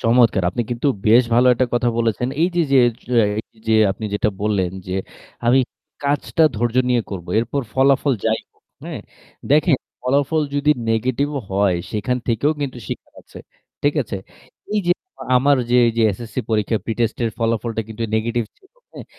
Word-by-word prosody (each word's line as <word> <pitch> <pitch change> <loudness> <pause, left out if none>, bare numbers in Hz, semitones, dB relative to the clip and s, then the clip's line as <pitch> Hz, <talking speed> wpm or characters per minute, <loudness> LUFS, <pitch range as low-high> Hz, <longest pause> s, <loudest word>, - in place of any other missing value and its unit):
চমৎকার! 115 -4 +3
আপনি 120 - -1
কিন্তু 120 +4 -1 0.2
বেশ 115 +3 +7
ভালো 125 +2 +5
একটা 130 +2 +1
কথা 120 0 +2
বলেছেন। 115 +1 0
এইযে, 175 0 +1
যে, 135 - +6 0.3
যো 125 - -1 0.4
এইযে 110 0 -1 0.2
আপনি 100 +3 -5
যেটা 105 - +1
বললেন, 100 -4 0 0.2
যে 90 - -3 0.5
আমি 125 +3 +5 0.5
কাজটা 145 +3 +1
ধৈর্য 120 +2 -1
নিয়ে 120 -2 +2
করব 90 -4 -6
এরপর 120 +5 -1
ফলাফল 135 +1 +3
যাই - - +1
হোক - - -37 0.2
হ্যাঁ? - - -6 0.5
দেখেন, 150 0 +4 0.3
ফলাফল 140 +4 +1
যদি 145 +1 +2 0.2
negative 130 +5 0
ও - - -4
হয় 95 -2 +2
সেখান 110 +4 -1
থেকেও 120 +6 +2
কিন্তু 135 -3 -3
শিখার - - -7
আছে। - - -13 0.4
ঠিক 145 0 +2
আছে? 105 -4 -5 0.6
এইযে 185 -4 +2 0.4
আমার 140 +3 +4
যে 125 - +4
এইযে 115 0 0
SSC 115 -1 -10
পরীক্ষার 110 0 +1
pre 115 - -2
test 115 -2 0
এর 115 - 0
ফলাফলটা 115 0 -1
কিন্তু 110 +1 -6
negative 115 +1 0
ছিল, 385 - -27 0.2
হ্যাঁ? - - -9
120 Hz, 165 wpm, -20 LUFS, 110-140 Hz, 0.6 s, বেশ